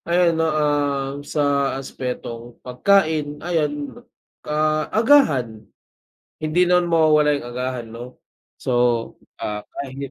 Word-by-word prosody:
Ayan 170 0 +3
no, 160 - +2
um, 145 -2 0
sa 145 -2 0
aspetong 120 -3 -6
pagkain 155 +1 +1
ayan, 150 -4 -2 0.5
ah, 155 0 +1
agahan 155 - +3 0.8
hindi 165 +4 +2
naman 180 -1 +2
mawawala 150 -3 +4
yung 120 - -9
agahan 125 -1 -3
'no 120 +2 -10 0.4
so, 130 - -3 0.7
ah, 105 0 -4 0.2
kahit. 140 0 -6
145 Hz, 105 wpm, -21 LUFS, 130-160 Hz, 0.8 s, mawawala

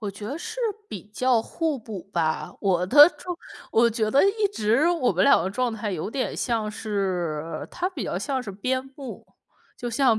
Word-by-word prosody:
我 210 -3 -3
觉 205 +1 -8
得 275 - -4
是 425 - -7 0.3
比 195 - -7
较 250 +1 +3
互 310 +4 -2
补 215 -5 -7
吧， 160 -2 -1
我 180 -3 +1
的 290 - +9
状 350 +3 -7 0.4
我 235 +1 +5
觉 220 -1 0
得 275 +9 +5
一 410 +2 +2
直， 230 - +2
我 330 - +2
们 185 +1 +2
两 - - +6
个 185 - -1
状 245 +4 0
态 210 -2 -3
有 175 +4 -3
点 260 +2 -2
像 225 -3 -1
是， 180 -7 -2
它 360 +1 -2
比 370 - -5
较 - - -2
像 265 -3 -2
是 210 - -6
边 255 +7 -1
牧。 275 -4 -8 0.5
就 240 - -4
像 235 -1 +3
225 Hz, 210 characters per minute, -25 LUFS, 200-275 Hz, 0.5 s, 的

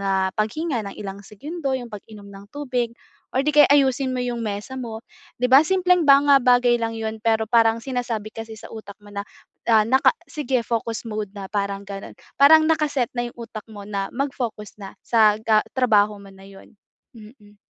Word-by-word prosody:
na 190 -1 0
paghinga 245 +5 -1
ng - - -16
ilang 200 -1 -7
segundo, 280 - -5
yung 245 -2 -7
pag-inom 210 0 -11
ng 200 0 -13
tubig, 250 -5 -2 0.4
or 260 - +1
'di 300 - +1
kaya 295 - +8
ayusin 265 -2 +2
mo - - -2
yung 240 -1 -3
mesa 210 +5 -5
mo 230 -4 -6 0.4
'di 250 - +2
ba. 270 - +9
Simpleng 360 -1 +2
mga 280 0 +6
bagay 245 -1 +4
lang 225 0 -2
'yun, 220 0 -4
pero 220 0 +1
parang 230 -1 +3
sinasabi 240 -4 -4
kasi 225 -1 -8
sa - - -11
utak 205 -3 -10
mo 205 - -14
na, 200 - -4 0.5
ah, 220 -2 +5
naka 260 +4 +4 0.2
"Sige, 260 -6 -2
focus 230 0 -3
mode 210 -3 -5
na," 195 - -6
parang 200 -1 -2
gano'n. 195 0 -9 0.2
Parang 315 +3 +7
naka-set 290 -6 0
na 240 -1 -3
yung 240 - -16
utak 230 -2 -9
mo 205 -2 -10
na 200 -1 -3
mag-focus 245 -7 -4
na 195 - -10
sa 215 -3 +4
ga 215 -1 +4 0.2
trabaho 210 -5 +3
mo 195 -1 -14
na 195 0 -16
'yon, 195 +2 -16 0.4
mm. 210 -2 -16
225 Hz, 190 wpm, -22 LUFS, 210-260 Hz, 0.5 s, ba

